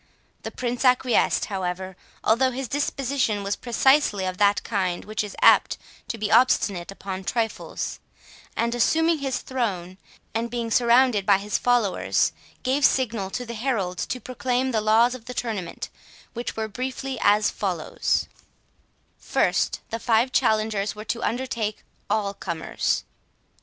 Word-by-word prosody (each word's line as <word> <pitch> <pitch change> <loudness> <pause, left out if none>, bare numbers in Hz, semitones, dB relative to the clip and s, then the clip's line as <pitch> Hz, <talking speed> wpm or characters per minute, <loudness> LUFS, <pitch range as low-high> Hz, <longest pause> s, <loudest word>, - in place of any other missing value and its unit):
The - - -5
Prince 245 0 -3
acquiesced, 250 -2 +3
however, 185 -1 -4 0.3
although 245 +4 +3
his 260 +1 -4
disposition 270 -5 -1
was 200 +1 -1
precisely 245 -4 +2
of 185 0 -4
that 205 0 +3
kind 185 -5 -2
which 215 0 -2
is 205 - -7
apt - - +6 0.3
to 240 - -4
be 210 -1 -2
obstinate 195 -8 +3
upon 195 -1 -6
trifles, 225 +2 -3 0.6
and, 235 +1 +1
assuming 320 +7 +2
his 270 -2 -2
throne, 190 -8 -3 0.3
and 230 +2 -1
being 235 -1 -3
surrounded 240 -2 +4
by 195 0 +5
his 205 +1 -2
followers, 240 -6 +2 0.3
gave 265 +3 +1
signal 230 -8 +2
to 245 +5 -4
the 235 - -6
heralds 215 -7 -2
to 255 - -3
proclaim 255 +1 -1
the 220 -3 +1
laws 225 +3 +4
of 250 -3 -9
the 250 0 -7
tournament, 205 -9 -4 0.4
which 240 0 -4
were 220 0 -1
briefly 260 +4 -4
as 210 +1 +4
follows: 180 -6 -1 0.9
First, - - 0
the 230 - -2
five 230 +3 +2
challengers 215 -4 +1
were 215 +1 -8
to 235 +1 -3
undertake 230 -4 -2 0.3
all 205 -1 0
comers. 170 -4 -2
225 Hz, 140 wpm, -24 LUFS, 200-250 Hz, 0.9 s, apt